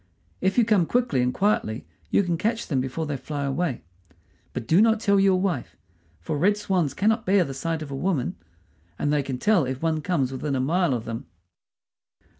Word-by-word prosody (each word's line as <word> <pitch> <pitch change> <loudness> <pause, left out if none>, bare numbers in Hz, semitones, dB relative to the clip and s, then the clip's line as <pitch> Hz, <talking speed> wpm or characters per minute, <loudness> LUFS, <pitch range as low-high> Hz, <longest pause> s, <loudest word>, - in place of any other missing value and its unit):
If 190 +4 +1
you 240 - +5
come 205 -7 +3
quickly 240 - +1
and 125 0 +1
quietly 130 - 0 0.2
you - - +3
can 175 -2 0
catch 225 +7 -1
them 135 -5 0
before 135 +5 -3
they 145 -2 -3
fly 145 +2 -4
away; 140 -1 -2 0.7
but 125 -2 -5
do 165 - +4
not 225 0 +4
tell 200 -2 +3
your 195 -1 +4
wife, 180 -10 -2 0.4
for 150 -3 -3
red 205 +5 +3
swans 180 -8 0
cannot 220 +3 +2
bear 190 0 +3
the 135 - -5
sight 160 +3 -3
of 145 - -9
a - - -3
woman, 150 -3 -1 0.6
and 145 - 0
they 150 - +2
can 135 -2 -4
tell 200 +5 +3
if 130 0 -3
one 160 -1 +1
comes 145 -6 0
within 135 +1 -2
a - - 0
mile 160 +2 +1
of 115 -1 -5
them." 115 +1 -6
160 Hz, 205 wpm, -25 LUFS, 135-195 Hz, 0.7 s, you